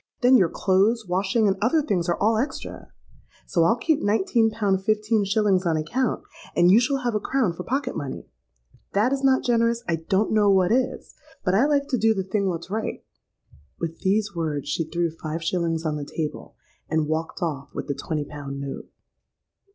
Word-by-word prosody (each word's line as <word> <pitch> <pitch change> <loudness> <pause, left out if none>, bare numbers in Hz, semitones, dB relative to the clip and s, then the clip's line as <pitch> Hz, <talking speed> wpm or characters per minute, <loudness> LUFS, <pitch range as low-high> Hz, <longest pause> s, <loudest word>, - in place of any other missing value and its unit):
Then 250 +1 +6
your 185 -8 +5
clothes, 205 +4 +2
washing, 195 +5 +1
and 195 0 +1
other 245 +9 +3
things 180 - -1
are 170 - +1
all 220 +2 +3
extra. 265 - -5 0.6
So 165 -2 +2
I'll 225 - +4
keep 295 +5 +1
nineteen 220 +2 +2
pound 200 -3 0
fifteen 215 +1 +1
shillings 200 -2 +2
on 165 -3 +1
account; 235 +11 -1 0.3
and 175 +1 +5
you 210 - +7
shall 270 +1 0
have 240 -2 0
a 210 - +1
crown 230 -5 0
for 170 - -7
pocket 260 +3 -2
money. 140 -4 -5 0.6
If - - -44
that 220 +7 +2
is 275 0 -2
not 265 -1 +3
generous, 235 -1 +1
I 165 - +1
don't 190 +6 0
know 210 -2 +4
what 190 -1 +3
is; 255 +2 -1 0.3
but 185 - +2
I 230 +9 +4
like 285 -1 +1
to 250 -4 0
do 220 +1 +3
the 190 - -1
thing 195 +1 -1
what's 170 +1 -5
right.'—With 165 - -7
these 205 +2 0
words 155 -4 -2
she 165 +2 -1
threw 170 +1 -1
five 160 0 -5
shillings 165 -1 -1
on 150 -1 -1
the 145 - -4
table, 150 +1 -5 0.3
and 160 -1 +1
walked 160 +2 -3
off 145 -5 -3
with - - -4
the 140 - -2
twenty 150 +1 -3
pound 140 -1 -7
note. 140 -1 -6
195 Hz, 195 wpm, -24 LUFS, 165-230 Hz, 0.6 s, you